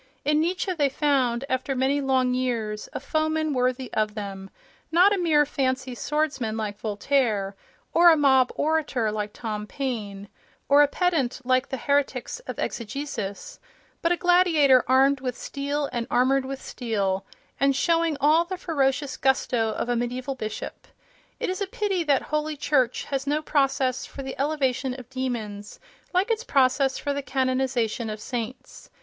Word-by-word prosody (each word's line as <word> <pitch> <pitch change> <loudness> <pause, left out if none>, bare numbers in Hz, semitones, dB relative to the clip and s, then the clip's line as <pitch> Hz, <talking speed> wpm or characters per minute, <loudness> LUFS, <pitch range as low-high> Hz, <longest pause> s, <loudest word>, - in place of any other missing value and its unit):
In 300 +1 +3
Nietzsche 365 +3 -1
they 290 -5 +1
found, 265 -3 +1
after 260 +1 -1
many 270 +3 +1
long 260 -2 +2
years, 230 -4 -2
a - - -4
foeman 310 +2 0
worthy 255 0 -1
of 215 0 0
them—not 215 - -1
a - - +1
mere 310 -4 +4
fancy 260 -2 -1
swordsman 265 -5 -1
like 210 -2 -4
Voltaire, 210 -2 0 0.4
or 345 +1 +7
a 325 - +6
mob 265 -3 +4
orator 295 -8 0
like 210 -1 -3
Tom 210 -2 -5
Paine, 210 -8 -4 0.4
or 285 +1 +6
a 290 - +6
pedant 305 -7 0
like 255 +1 +2
the 265 - -3
heretics 280 - -1
of - - -5
exegesis, 250 - -5 0.4
but 335 - +2
a 350 - +2
gladiator 335 -8 +5
armed 270 +2 +4
with 250 -2 -3
steel 285 +1 -3
and 235 -1 -2
armoured 260 +2 +2
with 270 0 -5
steel, 200 -8 -2 0.4
and 275 0 +3
showing 330 0 +1
all 310 +4 +4
the 370 +2 -5
ferocious 280 -5 0
gusto 250 -4 +1
of - - -3
a 245 - +1
mediaeval 250 +3 -2
bishop. 215 -4 -6 0.5
It - - -1
is 375 +2 -3
a 400 - 0
pity 390 -3 -1
that 280 -3 +2
Holy 305 0 -2
Church 265 -4 +1
has 275 0 -3
no 300 +2 0
process 270 -4 +1
for 275 - -8
the 265 0 -5
elevation 270 -3 0
of 250 0 -13
demons, 225 -6 -4 0.3
like 375 +5 +1
its 455 0 0
process 270 - +2
for 285 - -2
the 285 - -2
canonization 255 -3 -1
of 215 0 -5
saints. 240 +2 -6
265 Hz, 160 wpm, -25 LUFS, 240-295 Hz, 0.5 s, or